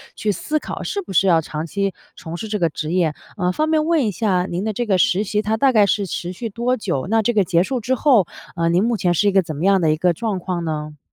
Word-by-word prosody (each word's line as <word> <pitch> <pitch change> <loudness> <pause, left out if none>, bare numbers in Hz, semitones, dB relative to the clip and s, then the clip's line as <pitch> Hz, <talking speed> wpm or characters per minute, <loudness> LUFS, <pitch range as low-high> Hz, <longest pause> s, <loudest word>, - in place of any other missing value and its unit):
去 215 - -1
思 305 +9 -2
考， - - -6
是 405 - -2
不 360 - -10
是 190 - +4
要 165 -3 +4
长 155 0 -5
期 195 +3 -2 0.2
从 165 0 -7
事 220 - -6
这 210 -1 -2
个 170 -2 +2
职 155 +1 -5
业。 170 -4 +1 0.2
呃， 180 -2 +1
方 310 +10 0
便 310 -1 +2
问 320 -5 +2
一 - - 0
下 185 -3 0
您 175 +3 -3
的 215 0 -2
这 240 +4 -2
个 195 -4 +2
实 185 +3 +3
习， 210 +1 -1
它 215 +1 -1
大 270 +4 +4
概 215 -4 +5
是 200 0 +1
持 175 -1 -4
续 230 +5 -5
多 240 +4 -1
久？ 175 -9 -2
那 225 +1 +3
这 240 +3 0
个 210 -3 +3
结 175 -1 +2
束 255 +5 -2
之 250 +3 0
后， 245 - +3 0.3
呃， 165 -1 +1
您 175 +3 +3
目 235 0 +1
前 175 -3 +1
是 205 +5 +2
一 - - +4
个 195 0 +4
怎 165 -4 -6
么 150 - -5
样 195 0 +4
的 160 -2 +3
一 155 - 0
个 175 +2 +2
状 205 +2 -2
况 175 -1 -3
呢？ 150 -1 -4
195 Hz, 315 characters per minute, -20 LUFS, 170-225 Hz, 0.3 s, 概